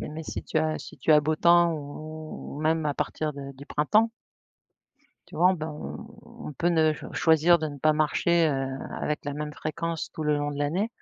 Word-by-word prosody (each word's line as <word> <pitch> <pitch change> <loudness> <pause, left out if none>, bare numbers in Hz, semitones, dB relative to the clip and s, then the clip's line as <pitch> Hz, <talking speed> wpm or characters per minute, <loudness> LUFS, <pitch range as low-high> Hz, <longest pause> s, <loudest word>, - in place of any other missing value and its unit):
mais 155 +2 -6
si - - -5
tu 160 - -1
as 155 0 0
si - - -11
tu 155 - +3
as 150 - +7
beau 155 +1 0
temps 170 0 +5
ou 155 0 -7
même 160 0 +1
à 145 - 0
partir 155 +2 -2
de 140 -1 -8
du 135 +1 -12
printemps 215 +11 +2 1.2
tu - - -15
vois, 180 +3 +4
ben 155 -3 -5 0.5
on 235 -8 -9
peut 165 +5 0
ne 160 -2 +3 0.2
choisir 165 +1 +4
de 155 - -2
ne 145 -2 -7
pas 155 +3 +3
marcher, 160 +2 +2
heu, 135 -2 -1 0.3
avec 150 0 -3
la 145 - -3
même 150 +1 -4
fréquence 165 +2 -4
tout 155 - -5
le 150 -1 +2
long 145 0 -2
de 145 - -6
l'année, 165 +9 0
155 Hz, 200 wpm, -27 LUFS, 150-165 Hz, 1.2 s, as